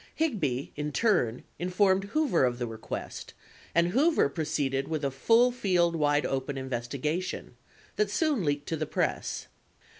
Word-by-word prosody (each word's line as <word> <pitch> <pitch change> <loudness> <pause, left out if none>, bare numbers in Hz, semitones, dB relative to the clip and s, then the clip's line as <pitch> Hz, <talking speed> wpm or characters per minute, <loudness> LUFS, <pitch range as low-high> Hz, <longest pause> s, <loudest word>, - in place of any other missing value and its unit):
Higby, 155 - -1
in 150 0 -3
turn, 160 - +1 0.2
informed 190 +2 +2
Hoover 250 - +2
of 125 -1 +1
the 120 - -2
request, 110 -1 -6 0.4
and 170 +1 +4
Hoover 280 - +3
proceeded 140 -3 -1
with 155 -3 -2
a 140 - 0
"full 230 - +4
field 180 -8 +2
wide 145 -1 +2
open 135 +1 -2
investigation" 130 +5 -3 0.4
that 210 -1 +2
soon 290 - +1
leaked 145 -1 -1
to 165 - 0
the 155 -1 -3
press. - - -1
160 Hz, 145 wpm, -28 LUFS, 135-200 Hz, 0.4 s, and